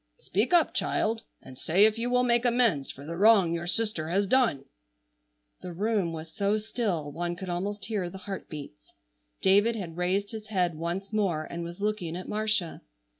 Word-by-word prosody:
Speak 210 - -1
up, 345 -2 +4
child, 225 +1 0 0.2
and 130 0 -12
say 185 +9 +5
if 220 +1 +2
you 240 +1 0
will 250 0 +3
make 240 -1 +3
amends 235 - +2
for 140 - -9
the 165 +2 -5
wrong 195 -3 +5
your 170 +1 -3
sister 200 -6 0
has 195 +4 +2
done!" 225 - +2 1.0
The 180 - -7
room 200 -1 0
was 160 0 -8
so 200 +1 +1
still 210 -9 -2
one 175 +3 -3
could 185 +1 -7
almost 190 +3 -3
hear 200 -4 -2
the 190 - -9
heartbeats. 155 - -8 0.5
David 205 +4 +4
had 175 -6 -6
raised 190 +3 0
his 215 -2 -7
head 180 -5 +1
once 175 +6 -4
more 190 -8 +1
and 170 +2 -6
was 170 +2 -7
looking 205 -6 -1
at 185 - -7
Marcia. 215 -5 -1
195 Hz, 180 wpm, -28 LUFS, 170-215 Hz, 1.0 s, say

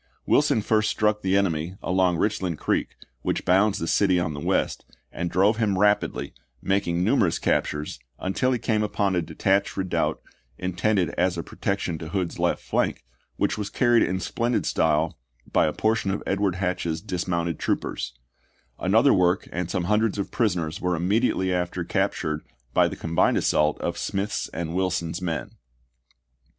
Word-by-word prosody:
Wilson 110 - +3
first 110 0 +2
struck 105 0 +1
the 95 +1 +2
enemy 85 -2 0
along 90 -1 +2
Richland 95 -4 -1
Creek, - - -1 0.3
which - - -2
bounds 95 +3 +3
the 80 - -3
city 95 -1 +3
on 80 -3 -1
the 70 - -6
west, - - 0 0.3
and 85 +1 -3
drove 100 +6 +3
him 105 -4 +1
rapidly, 105 +1 +1 0.3
making 90 -3 0
numerous 105 -5 +2
captures, 75 0 -1 0.2
until 110 +7 0
he 125 - +1
came 110 -2 0
upon 100 -2 0
a 90 - +2
detached 95 +5 0
redoubt, 95 -2 0 0.4
intended 90 +1 0
as 90 0 +2
a 85 - -3
pro - - -13
tection 90 -4 -1
to 80 - -7
Hood's 90 -1 -2
left - - 0
flank, - - -1 0.3
which - - 0
was 100 -1 -3
carried 120 0 +3
in 95 +1 +1
splendid 115 +7 -1
style 80 0 +1 0.3
by - - +4
a - - +1
portion 110 -2 0
of 95 - -2
Edward 100 -2 0
Hatch's 90 -3 -1
dis 90 +2 -4
mounted 85 -2 -1
troopers; - - -2 0.6
another 110 +9 +4
work 90 0 +2
and 90 0 -3
some 90 - -1
hun 105 +4 +2
dreds 110 -2 0
of 100 - -3
prisoners 90 -9 -1
were 90 -1 +1
immediately 95 +1 +1
after 90 -1 -1
captured 75 0 -1 0.3
by - - +4
the - - -5
combined 85 0 +1
assault 75 0 +2
of - - -2
Smith's 100 +2 -2
and 85 -1 -4
Wilson's 90 -2 -1
men. 85 -3 -3
95 Hz, 165 wpm, -25 LUFS, 85-105 Hz, 0.6 s, by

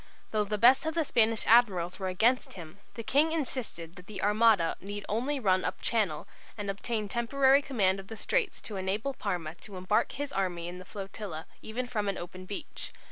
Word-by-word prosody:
Though 215 -1 +1
the 210 +1 -2
best 255 +7 +6
of 320 - -2
the 325 -2 +1
Spanish 225 -3 +2
admirals 200 -7 +4
were 190 - -2
against 225 +8 +2
him, 170 0 -10 0.2
the 230 - -5
King 295 +7 +3
insisted 250 - -4
that 180 - -12
the 215 - -7
Armada 210 -4 +4
need 205 +1 -6
only 255 +7 -1
run 185 -5 +2
up - - -2
Channel 200 -10 0 0.3
and 205 -2 -2
obtain 215 +1 -3
temporary 265 +5 +3
command 195 -9 +1
of 195 - -10
the 225 - -8
straits 470 - -1
to 210 - -6
enable 200 +8 -1
Parma 165 -10 -3
to 200 -3 -9
embark 185 +3 +1
his 285 0 -4
army 175 -3 -1
in 180 +1 -7
the 185 - -10
flotilla 195 -4 -6 0.2
even 240 +4 -3
from 215 -5 -2
an 195 - -2
open 185 +1 -8
beach. 200 - -6
210 Hz, 195 wpm, -30 LUFS, 185-240 Hz, 0.3 s, best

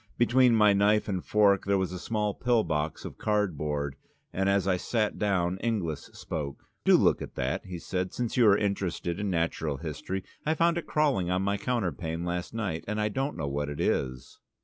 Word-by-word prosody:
Between 120 0 +4
my 105 -2 +6
knife 105 +2 +3
and 95 -4 -2
fork 100 -2 +3
there 100 0 +2
was 95 -2 -1
a 90 - -5
small 105 0 -1
pill 120 -1 +2
box 75 0 -2
of - - -8
cardboard, 75 -9 -1 0.4
and 95 +1 +1
as 100 -1 +2
I 95 - +3
sat 105 +3 -1
down 95 -3 +1
Inglis 90 -11 -2
spoke. 70 -3 -5 0.2
"Do - - +6
look - - +3
at - - -7
that," 65 +7 -2
he 90 -1 -5
said, 90 +2 -3
"since 120 -2 -3
you 120 -3 +5
are 100 -1 +6
interested 100 -3 -2
in 105 -1 -1
natural 80 -4 -1
history. 80 +5 -4 0.2
I 155 +1 +1
found 170 +1 +2
it - - -9
crawling 140 - +1
on 90 +1 +1
my 100 +1 0
counterpane 90 -8 -2
last 90 0 -3
night, 100 -8 -3
and 105 +1 -2
I 105 0 +1
don't 135 +6 -2
know 75 -4 -2
what 70 +1 -2
it 75 - -6
is." 65 -1 -2
95 Hz, 200 wpm, -28 LUFS, 85-105 Hz, 0.4 s, my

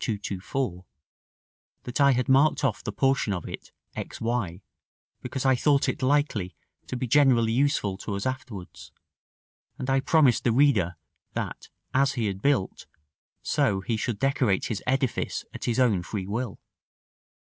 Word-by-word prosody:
224, 100 -1 -3 1.0
that 125 +3 -2
I 140 -1 +6
had 125 0 0
marked 140 +4 +4
off 135 -5 0
the - - -3
portion 135 -3 +1
of 90 - -4
it, - - -8 0.2
x - - -6
y, 110 -6 -2 0.6
because 130 +1 -4
I 130 - +5
thought 140 +2 +2
it - - -2
likely 130 -9 +1 0.3
to - - -4
be 125 - -2
generally 125 -3 +4
useful 120 -7 +1
to 100 - -4
us 100 - -4
afterwards; 130 -8 -6 0.9
and 130 +1 -2
I 135 - +3
promised 140 -3 +3
the 120 - +3
reader 115 - +3 0.4
that - - -5 0.2
as 135 +1 +3
he 120 -4 -1
had 95 -2 -3
built, 140 -8 0 0.6
so 95 -1 +1
he 115 +4 -1
should 110 0 -2
decorate 110 -6 +1
his 105 - -3
edifice 130 -1 -1
at - - -6
his 120 +1 0
own 115 -8 +3
free 95 +1 -5
will. 110 +3 -4
125 Hz, 155 wpm, -26 LUFS, 100-135 Hz, 1.0 s, I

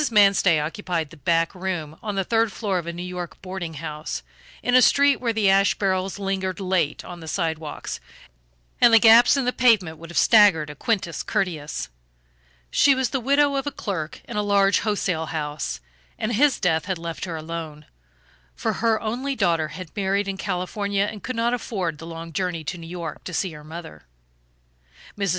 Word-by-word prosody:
Manstey 195 -6 +5
occupied 165 0 -3
the 165 - -13
back 165 +3 +1
room 180 -5 -4
on 210 -2 -4
the 195 - +1
third 225 +2 +1
floor 195 -1 -1
of 170 - -7
a - - -2
New 175 +1 -6
York 180 -2 -6
boarding 185 -3 -5
house, 150 - -5 0.4
in 245 - 0
a 255 - +7
street 280 +2 +5
where 235 -2 -1
the 220 -3 +1
ash 195 +1 +4
barrels 190 -1 0
lingered 195 -1 -2
late 185 -5 0
on 175 -1 -8
the 160 - -10
sidewalk 160 -3 -3 0.9
and 240 - +7
the 225 - +8
gaps 230 +4 +7
in 270 - 0
the 250 - +1
pavement 200 -10 +3
would 165 0 -10
have 175 - -6
staggered 195 -9 +5
a - - -11
Quintus 190 - -1
Curtius. 155 - -2 0.8
She 280 -1 +5
was 260 -1 0
the 270 - 0
widow 280 +3 +3
of 275 +1 -2
a - - -1
clerk 180 - -5
in - - -5
a - - +2
large 200 -1 +3
wholesale 185 -6 -1
house, 150 - -3 0.4
and 225 +2 -2
his 275 +4 +3
death 160 -3 +1
had 190 -1 -2
left 165 +1 -5
her 170 -3 -5
alone, 160 -1 -6 0.7
for - - -1
her 225 -1 +3
only 255 +5 -2
daughter 165 -8 +1
had 165 +1 -9
married 200 0 0
in 195 - -2
California, 195 +1 -1
and 210 - -9
could 255 - -4
not 230 +1 +1
afford 185 -10 -3
the 165 - -9
long 165 0 -8
journey 175 -2 -2
to 180 +4 -4
New 165 - -9
York 170 -3 -6
to 180 - -5
see 185 +1 -1
her 150 -1 -11
mother. 155 - -10 1.1
Mrs. 200 -2 -1
185 Hz, 190 wpm, -24 LUFS, 165-210 Hz, 1.1 s, the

